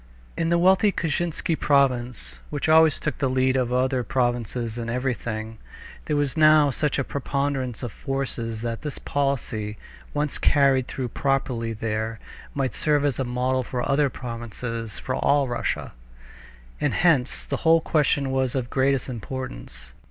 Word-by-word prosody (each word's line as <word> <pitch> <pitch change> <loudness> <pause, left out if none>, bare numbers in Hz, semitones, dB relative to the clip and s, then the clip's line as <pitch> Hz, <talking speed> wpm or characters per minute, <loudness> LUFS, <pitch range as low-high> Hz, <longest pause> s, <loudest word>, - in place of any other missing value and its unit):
In 165 -1 0
the 170 - +3
wealthy 190 +4 +4
Kashinsky 165 0 -1
province, 130 -5 +1
which 145 0 -2
always 160 -1 +5
took 150 - -3
the 135 - +1
lead 130 0 +2
of 125 -2 +1
other 130 +1 +1
provinces 120 -2 -1
in 115 0 -4
everything, 115 -3 -3 0.5
there 150 - 0
was 145 0 0
now 155 -2 +6
such 150 +3 0
a 135 - +1
preponderance 140 -3 -2
of 120 - -3
forces 120 -4 -4
that 115 -1 -3
this 150 -2 -5
policy, 120 -7 -2 0.3
once 150 -1 -2
carried 135 -3 +3
through 130 -2 -4
properly 125 -3 -1
there, 110 0 -3 0.4
might 135 -2 -1
serve 150 -2 +1
as 140 -3 0
a - - +1
model 125 +1 0
for 125 0 -3
other 140 0 +3
provinces 115 -2 -6
for 130 - -4
all 140 +1 +2
Russia. 120 -1 -2 0.9
And - - 0
hence 145 -7 +2
the - - -2
whole 165 0 +5
question 145 -3 +1
was 130 -1 0
of 130 - +1
the 120 - -13
greatest 135 -1 +2
importance. 110 - -7
130 Hz, 155 wpm, -24 LUFS, 120-145 Hz, 0.9 s, now